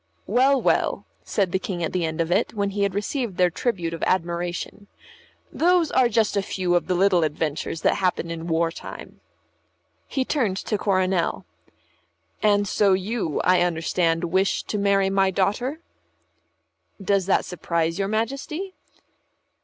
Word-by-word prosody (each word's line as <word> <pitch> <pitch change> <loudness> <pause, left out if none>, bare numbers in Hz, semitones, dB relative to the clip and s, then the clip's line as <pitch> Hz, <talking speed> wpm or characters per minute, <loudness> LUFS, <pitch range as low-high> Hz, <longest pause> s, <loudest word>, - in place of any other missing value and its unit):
"Well, 260 +5 +3
well," - - +1 0.2
said 195 -4 0
the 190 - +1
King 180 -3 -4
at 160 - -2
the 180 -2 0
end 160 +1 -2
of 165 +1 -2
it, 185 - +1
when 200 -1 -1
he 200 +1 -3
had 200 -1 0
received 210 -1 -2
their 180 -1 +3
tribute 175 -6 -2
of 165 - -6
admiration. 175 +2 -2 0.7
"Those 345 -1 +3
are 255 -2 +4
just 220 -2 +1
a 200 - +2
few 185 -2 -1
of 175 - +1
the 185 - +1
little 185 -2 +3
adventures 155 +1 -2
that - - +2
happen 180 -3 -1
in 165 0 -5
war 165 0 +1
time." - - -10 0.9
He 265 -2 -1
turned 225 -12 0
to 210 - -2
Coronel. 185 - 0 1.0
"And 205 -1 +3
so 200 0 +3
you, 190 -3 -1
I 180 -1 +3
understand, 165 0 0
wish 190 +3 +1
to 210 - -3
marry 195 -1 +2
my 195 0 +3
daughter?" 215 - -1 1.2
"Does 195 -1 0
that 195 - +2
surprise 170 -1 -2
your 195 - 0
Majesty?" 275 - -3
190 Hz, 155 wpm, -24 LUFS, 175-210 Hz, 1.2 s, are